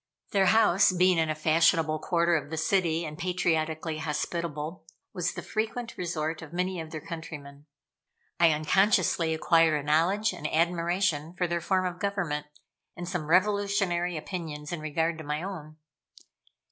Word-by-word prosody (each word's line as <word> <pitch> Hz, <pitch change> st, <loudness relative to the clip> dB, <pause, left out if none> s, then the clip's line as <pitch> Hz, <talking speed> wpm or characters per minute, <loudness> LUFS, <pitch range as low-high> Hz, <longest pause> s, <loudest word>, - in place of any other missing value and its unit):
Their 195 Hz, -2 st, +3 dB
house, 200 Hz, -2 st, +5 dB
being 180 Hz, -1 st, +3 dB
in 160 Hz, -1 st, +1 dB
a 155 Hz, -, 0 dB
fashionable 155 Hz, 0 st, +3 dB
quarter 170 Hz, +1 st, +2 dB
of 145 Hz, -3 st, -2 dB
the 160 Hz, -, -4 dB
city 170 Hz, -1 st, +1 dB
and 150 Hz, 0 st, -7 dB
patriotically 160 Hz, -3 st, -1 dB
hospitable, 160 Hz, +1 st, -3 dB, 0.3 s
was 180 Hz, -2 st, -1 dB
the -, -, -6 dB
frequent 225 Hz, +2 st, -3 dB
resort 160 Hz, -2 st, -3 dB
of 160 Hz, -2 st, -10 dB
many 180 Hz, 0 st, -2 dB
of 160 Hz, -, -8 dB
their 155 Hz, -1 st, -7 dB
countrymen. 150 Hz, -3 st, -8 dB, 0.7 s
I 170 Hz, -1 st, +6 dB
unconsciously 170 Hz, +1 st, +2 dB
acquired 160 Hz, -1 st, +3 dB
a -, -, -6 dB
knowledge 175 Hz, +8 st, +2 dB
and 150 Hz, -4 st, -5 dB
admiration 170 Hz, -1 st, 0 dB
for 180 Hz, -, 0 dB
their 170 Hz, 0 st, -1 dB
form 185 Hz, +2 st, +1 dB
of 180 Hz, 0 st, -4 dB
government, 180 Hz, -8 st, -2 dB, 0.5 s
and 175 Hz, 0 st, -6 dB
some 175 Hz, -5 st, -3 dB
revolutionary 185 Hz, -2 st, +1 dB
opinions 155 Hz, -2 st, -6 dB
in 170 Hz, -, -3 dB
regard 160 Hz, +2 st, -1 dB
to -, -, -7 dB
my 150 Hz, +2 st, -3 dB
own. 155 Hz, -6 st, -7 dB
170 Hz, 155 wpm, -28 LUFS, 155-180 Hz, 0.7 s, I